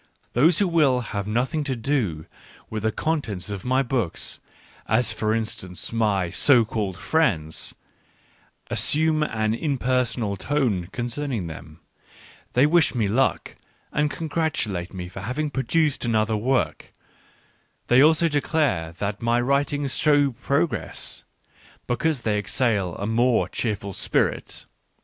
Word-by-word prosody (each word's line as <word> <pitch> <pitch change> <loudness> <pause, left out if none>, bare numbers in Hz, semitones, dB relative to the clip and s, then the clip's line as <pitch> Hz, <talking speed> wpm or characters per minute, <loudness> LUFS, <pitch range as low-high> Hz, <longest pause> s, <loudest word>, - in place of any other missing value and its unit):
Those 155 +7 +4
who 200 - +3
will 150 -7 +3
have 100 -4 -4
nothing 130 +8 0
to 135 -2 -1
do 110 - -1 0.5
with 110 -1 -3
the 110 +1 +1
contents 110 - -2
of 100 -2 -5
my 130 +2 +2
books, 120 -9 -2 0.5
as 120 -2 +2
for 110 0 -1
instance 110 -5 -3
my 100 -6 +1
so 120 +5 +5
called 105 -5 -3
friends, 85 - 0 1.0
as - - +1
sume 155 +1 +2
an 110 -7 0
"impersonal" 125 -6 0
tone 115 -9 0
concerning 120 -3 -3
them: 80 -1 -10 0.7
they 125 +3 +5
wish 160 -2 +3
me 110 -4 +1
luck, 125 +6 0 0.4
and 150 0 +1
congratulate 155 - -2
me 90 -2 -6
for 90 - -8
having 145 +5 -2
pro 135 - -1
duced 150 +3 +1
another 110 -2 +1
work; 125 +5 -1 0.9
they 125 +2 +5
also 160 +3 +5
declare 145 - 0
that 100 +3 -4
my 115 +1 +2
writings 140 +2 0
show 145 -2 +3
progress, 140 +6 -2 0.6
because 135 +1 -1
they 105 -2 +1
exhale 100 -3 0
a 100 - -4
more 120 +2 +2
cheerful 100 -4 -3
spirit. - - -1
120 Hz, 130 wpm, -24 LUFS, 105-145 Hz, 1.0 s, so